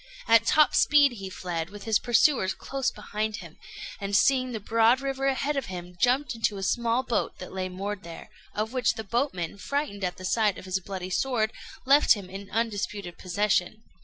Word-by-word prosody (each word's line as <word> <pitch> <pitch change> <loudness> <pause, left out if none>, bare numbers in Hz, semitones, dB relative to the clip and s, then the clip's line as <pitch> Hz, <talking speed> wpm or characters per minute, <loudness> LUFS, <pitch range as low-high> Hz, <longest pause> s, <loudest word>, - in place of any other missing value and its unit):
At 230 0 +5
top 305 -1 +5
speed 290 -2 +5
he 195 -5 -7
fled, 175 -3 -4
with 205 0 -10
his 220 -2 +2
pursuers 240 -4 +3
close 270 -1 -2
behind 215 +1 -4
him; - - -10 0.4
and, 200 0 -2
seeing 255 +3 +3
the 225 - -4
broad 225 +4 +3
river 270 0 -2
ahead 275 +2 0
of 275 -3 -2
him, 180 -1 -7
jumped 255 +3 +2
into 225 -3 -1
a 195 - -5
small 235 +4 +1
boat 235 - -1
that 185 - -9
lay 185 -1 -3
moored 195 +2 -5
there, 170 -2 -10 0.2
of 215 +3 -2
which 255 -2 +1
the 220 - -5
boatmen, 200 - -2
frightened 205 -2 -3
at 180 -1 -2
the 185 - -8
sight 210 +1 +1
of - - -10
his 190 0 -1
bloody 185 -1 -6
sword, 220 +1 0 0.3
left 280 +3 +6
him 190 -3 -9
in 195 +1 -8
undisputed 205 -5 -3
possession. 200 +2 0
215 Hz, 190 wpm, -27 LUFS, 190-250 Hz, 0.4 s, left